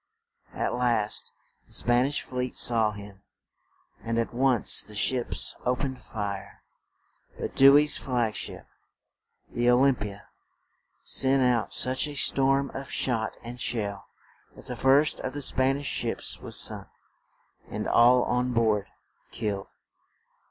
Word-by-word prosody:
At - - -2
last 120 -4 -1 0.4
the - - -16
Span 120 +2 +3
ish 145 - -2
fleet 125 0 -4
saw 115 -3 +2
him, 100 -1 -11 0.8
and 115 0 -2
at 115 +1 -1
once 125 -1 +3
the 105 - -12
ships 120 +3 +1
o 125 0 +1
pened 130 0 -4
fire; 100 -5 -6 0.8
but - - -4
Dew 140 +1 +8
ey's 150 0 +3
flag 120 -4 -1
ship, - - -6 0.9
the 120 0 +1
"O 125 - +6
lym 135 +1 +5
pi 105 -4 -5
a," 100 0 -10 0.8
sent 135 0 +3
out 120 -3 +1
such 130 +3 +2
a 145 - -8
storm 135 0 +2
of 135 0 -7
shot 115 -4 -2
and 120 +1 -8
shell, 100 -4 -3 0.5
that - - -14
the - - -5
first 140 +3 +3
of 130 - -5
the 145 - -5
Span 130 +1 +2
ish 145 - -7
ships - - -3
was - - -4
sunk, - - -3 0.8
and - - -4
all 125 +1 +5
on 125 +1 -1
board 110 -3 +1 0.4
killed. 100 -2 -4
125 Hz, 145 wpm, -26 LUFS, 110-135 Hz, 0.9 s, Dew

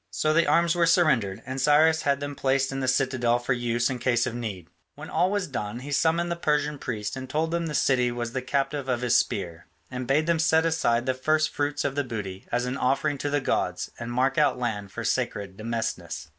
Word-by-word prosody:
So 155 0 0
the 165 +2 +3
arms 170 0 +3
were 170 -1 +2
surrendered, 140 - +2
and 130 +1 -4
Cyrus 155 +3 +4
had 140 -1 +1
them 145 0 -4
placed 135 0 +1
in 135 - -3
the 130 - -1
citadel 130 -2 +2
for 120 +1 -1
use 120 0 0
in 130 -2 -3
case 120 -1 +2
of 120 - -3
need. 105 -8 -5 0.3
When 145 +2 -9
all 175 +3 +2
was 205 -1 0
done 120 - -5
he 145 +2 -7
summoned 165 +4 +1
the - - 0
Persian 150 -3 0
priests 110 -1 -4
and 130 -1 -7
told 160 +4 -1
them 170 -1 -1
the 150 - -4
city 125 -3 +2
was 120 -1 -4
the 130 - -2
captive 135 +1 -2
of 125 -1 0
his 125 -1 +2
spear 90 -3 -1 0.2
and 125 -1 -5
bade 150 +4 +2
them 170 -1 +1
set 160 0 +3
aside 120 -7 +1
the 130 - +1
first 155 +4 +1
fruits 145 0 -2
of 135 - 0
the 145 +1 0
booty 105 -6 -6
as 120 +1 0
an 125 +2 -3
offering 140 +3 0
to 145 - -2
the 145 0 0
gods - - -1
and 120 0 -5
mark 130 +2 +1
out - - +3
land 105 -5 -3
for - - -5
sacred 100 -2 -2
demesnes. 110 -7 -4
130 Hz, 230 wpm, -26 LUFS, 120-150 Hz, 0.3 s, Cyrus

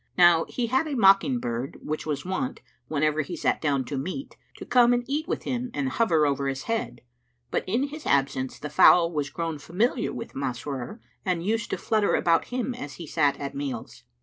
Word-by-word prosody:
Now 175 -2 +6
he 245 - -1
had 265 +7 +1
a 290 - -2
mockingbird 195 - +2
which 155 +1 -4
was 150 +1 -2
wont, 255 +9 -3 0.3
whenever 155 0 +1
he 155 +4 -5
sat - - 0
down 140 -4 +1
to 135 +2 -3
meat, 185 - -5 0.2
to - - -8
come 245 -1 +5
and 245 0 +1
eat 295 +5 -2
with - - -2
him 250 -1 -2
and 140 -2 0
hover 160 - +2
over 140 -1 0
his 135 0 -3
head; 125 - -3 0.5
but - - 0
in 235 +7 +1
his 305 +1 -8
absence 135 -2 +1
the 150 - -7
fowl 170 +2 +6
was 145 -2 -1
grown 165 -1 -4
familiar 220 - 0
with 230 - -7
Masrur 135 - -4 0.2
and 180 -3 -1
used 225 +3 0
to - - -1
flutter 215 -3 +1
about 165 -1 +3
him 250 0 -2
as 145 -12 -7
he 170 - -8
sat 145 -1 +1
at 140 -1 -4
meals. 140 -4 -5
165 Hz, 200 wpm, -26 LUFS, 140-235 Hz, 0.5 s, Now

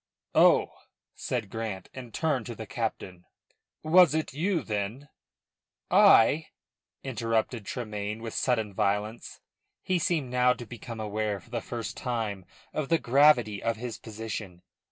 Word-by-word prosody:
"Oh!" - - +5 0.4
said 100 - -4
Grant, 110 -5 -4
and 125 -3 -9
turned 140 -4 -1
to 120 - -6
the 110 - -7
captain. 100 -4 -4 0.6
"Was 160 0 +6
it 160 -3 -2
you 170 +4 0
then 110 +7 -4 0.5
" - - -65
"I?" 145 +8 +6 0.6
interrupted 115 -3 -1
Tremayne 105 -2 -4
with 115 - -5
sudden 110 -5 0
violence. 105 +4 -2 0.4
He 185 -1 +1
seemed 155 -6 0
now 125 0 +4
to 125 -1 -9
become 115 0 -8
aware 105 -1 -2
for 120 - -21
the 120 -2 -2
first 115 -2 -5
time 110 -7 -3 0.3
of 155 -3 -2
the 165 - +4
gravity 125 -7 +4
of 115 0 0
his 120 0 -6
position. 110 -5 -7
115 Hz, 140 wpm, -28 LUFS, 105-130 Hz, 0.6 s, Was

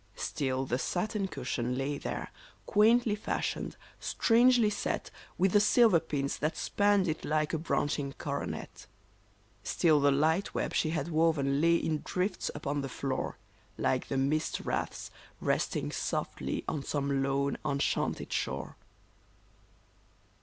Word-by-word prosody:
Still 130 -2 -2
the 125 -1 -1
satin 200 +5 -1
cushion 125 -8 -3
lay 140 +2 -2
there, - - -4 0.3
quaintly 225 +1 +4
fashioned, 210 - -3 0.2
strangely 235 -1 +4
set - - -2 0.3
With 190 +1 +3
the 205 - +6
silver 215 -3 +5
pins 145 -4 -2
that 155 +2 -1
spanned 205 -2 +2
it 160 -1 -2
like 155 0 0
a 160 - 0
branching 145 -3 -1
coro 140 0 -3
net; - - -7 0.8
Still 155 -3 +3
the 145 0 +4
light 160 +7 +1
web - - -1
she 155 - +1
had 160 0 -2
woven 155 -4 +2
lay 170 +1 +5
in 155 -2 0
drifts 185 +3 -1
upon 145 0 -2
the 135 - -4
floor. 130 +1 -3 0.4
Like 130 - 0
the 135 - -2
mist 145 +4 0
wreaths - - -3 0.3
resting - - 0
softly - - -2
on 150 - -2
some 140 -1 -1
lone, 140 +1 0
enchanted 140 -2 -1
shore - - -3
155 Hz, 135 wpm, -30 LUFS, 140-185 Hz, 0.8 s, the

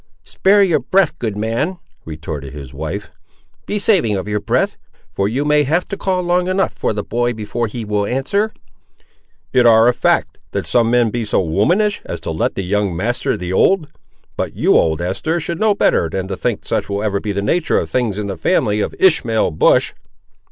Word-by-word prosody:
"Spare 200 +1 +3
your 170 -6 +2
breath, 165 +4 +1
good 110 -4 -3
man," 115 - -1 0.3
retorted 75 -3 -7
his 70 -3 -9
wife; 80 +8 -5 0.6
"be 210 - -1
saving 185 - +2
of 95 +1 -4
your 105 0 -1
breath; - - 0 0.4
for 100 - -1
you 135 +6 -1
may 150 0 +4
have 160 +6 +1
to - - -3
call 185 -2 -1
long 180 +1 +1
enough 190 +1 0
for - - -1
the 105 -1 -3
boy 120 +1 -1
before 110 +2 -3
he 110 +1 -6
will 105 -1 -1
answer!" 200 - 0 1.0
"It 125 -2 +5
ar' 115 0 +6
a 125 - +4
fact, - - 0
that - - -2
some 115 -2 +2
men 120 -2 +3
be 120 0 -2
so 105 - 0
womanish, 175 - +1
as - - -6
to - - -4
let 80 - -1
the 95 - -3
young 100 -1 -1
master 120 +7 -1
the 90 +1 -4
old! 175 - +2 0.4
But, - - -3
you, - - +3
old 80 0 +2
Esther, 155 - -1
should 170 +1 -4
know 215 -2 +3
better 85 - +2
than 95 +2 -3
to 95 - -2
think - - -2
such - - -1
will 100 +1 -2
ever 100 -2 0
be 105 - -3
the 100 0 -2
nature 165 +10 +1
of - - -1
things 120 -6 -1
in 105 - -3
the 100 -2 -4
family 110 - +1
of - - -3
Ishmael 120 - +2
Bush." 80 - +3
115 Hz, 205 wpm, -18 LUFS, 100-165 Hz, 1.0 s, ar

